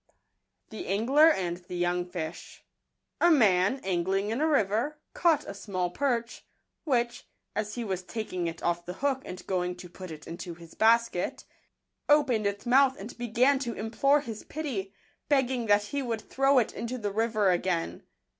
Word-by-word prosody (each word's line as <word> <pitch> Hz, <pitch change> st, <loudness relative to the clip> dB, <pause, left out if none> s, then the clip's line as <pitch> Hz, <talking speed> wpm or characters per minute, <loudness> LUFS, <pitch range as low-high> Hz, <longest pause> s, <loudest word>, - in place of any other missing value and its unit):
SngUr 235 Hz, -, +4 dB
anti 180 Hz, -1 st, -4 dB
tfj* 175 Hz, 0 st, 0 dB
¥owig 165 Hz, -2 st, -6 dB, 0.6 s
,${$&. 345 Hz, -, +6 dB
MAN, 200 Hz, +1 st, +3 dB
angling 190 Hz, +3 st, 0 dB
in 235 Hz, +6 st, -1 dB
a 315 Hz, -, +3 dB
river, 245 Hz, +1 st, +1 dB, 0.2 s
caught 330 Hz, -4 st, +2 dB
a -, -, -6 dB
small 185 Hz, -3 st, -3 dB
perch, 240 Hz, -1 st, -1 dB, 0.4 s
which, 240 Hz, -4 st, 0 dB, 0.3 s
as 210 Hz, 0 st, -2 dB
he 240 Hz, -, -3 dB
was 190 Hz, -4 st, -2 dB
taking 185 Hz, -2 st, -4 dB
it 165 Hz, 0 st, -6 dB
off 175 Hz, 0 st, 0 dB
the 180 Hz, -, -6 dB
hook 270 Hz, -2 st, +1 dB
and 180 Hz, -, -8 dB
going 180 Hz, -1 st, -1 dB
to 180 Hz, 0 st, -10 dB
put 185 Hz, +1 st, -10 dB
it 155 Hz, -1 st, -9 dB
into 170 Hz, +1 st, -7 dB
his 165 Hz, -1 st, -14 dB
basket, 230 Hz, -4 st, +2 dB, 0.6 s
opened 265 Hz, -8 st, +4 dB
its 200 Hz, 0 st, -4 dB
mouth 265 Hz, +2 st, +4 dB
and 210 Hz, +5 st, -8 dB
began 245 Hz, +4 st, +3 dB
to 235 Hz, -4 st, -3 dB
implore 275 Hz, +6 st, +2 dB
his 225 Hz, -6 st, -7 dB
pity, 255 Hz, -11 st, -4 dB, 0.4 s
begging 260 Hz, -4 st, +1 dB
that 205 Hz, 0 st, +4 dB
he 280 Hz, +7 st, -3 dB
would 230 Hz, -4 st, -3 dB
throw 270 Hz, +4 st, +2 dB
it 240 Hz, -, +2 dB
into 235 Hz, +2 st, -4 dB
the 210 Hz, -4 st, -3 dB
river 215 Hz, -2 st, +2 dB
again. 175 Hz, -1 st, -1 dB
215 Hz, 165 wpm, -28 LUFS, 180-255 Hz, 0.6 s, ${$